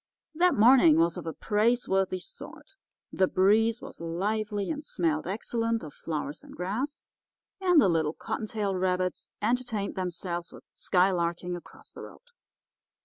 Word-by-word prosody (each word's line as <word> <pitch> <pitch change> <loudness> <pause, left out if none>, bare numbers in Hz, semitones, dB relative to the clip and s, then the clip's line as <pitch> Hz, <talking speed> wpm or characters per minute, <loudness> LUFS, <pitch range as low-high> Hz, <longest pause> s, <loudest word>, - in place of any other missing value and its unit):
"That 355 +3 +3
morning 220 - +6
was 165 0 +3
of - - -7
a 160 - -3
praiseworthy 210 -4 +1
sort. 295 - -8 0.4
The 190 - +3
breeze 220 +5 +3
was - - -10
lively, 205 - -2
and 300 -1 -4
smelled 165 - -1
excellent 230 +3 -1
of 150 - -8
flowers 150 -1 -5
and - - -13
grass, 225 +12 -3 0.5
and 360 -4 +5
the 275 - +5
little 160 -3 +1
cottontail 210 -1 -3
rabbits 185 0 -1 0.2
entertained 230 -3 -1
themselves 175 -2 -3
with - - -13
skylarking 180 -1 +1
across 175 - -12
the - - -10
road. - - -12
195 Hz, 140 wpm, -28 LUFS, 175-230 Hz, 0.5 s, morning